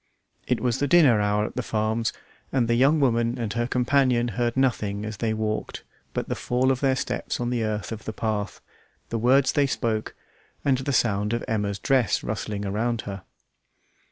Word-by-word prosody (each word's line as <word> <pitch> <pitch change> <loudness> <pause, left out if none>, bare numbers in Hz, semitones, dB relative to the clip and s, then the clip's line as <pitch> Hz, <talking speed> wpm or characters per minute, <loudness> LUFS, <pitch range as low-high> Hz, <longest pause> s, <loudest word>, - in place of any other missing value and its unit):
It - - +1
was 125 -2 0
the 145 - +1
dinner 135 -9 +5
hour 105 +1 +1
at - - -7
the 125 - -1
farms, 110 0 -1 0.4
and 125 -3 +1
the 120 - +2
young 135 +6 +4
woman 120 -3 +2
and 115 -4 -3
her 120 0 0
companion 125 -1 +2
heard 120 +3 -1
nothing 105 -6 0
as 110 -1 -5
they 110 +1 -1
walked 110 0 -3 0.3
but - - -2
the - - -1
fall 125 +2 +1
of 130 - 0
their 135 -1 +2
steps 125 -1 -3
on 120 0 -1
the 120 -2 0
earth 105 0 -3
of 110 -1 -6
the - - -3
path, 105 -2 -3 0.5
the 115 - -2
words 130 +4 +4
they 145 -1 +2
spoke, 110 -4 -2 0.5
and 135 -2 +3
the 135 +2 -2
sound 105 -4 +1
of 120 - -2
Emma's 105 -2 -1
dress 125 -1 +1
rustling 105 -1 -3
round 110 +4 -1
her. 100 -1 -7
115 Hz, 190 wpm, -25 LUFS, 110-125 Hz, 0.5 s, dinner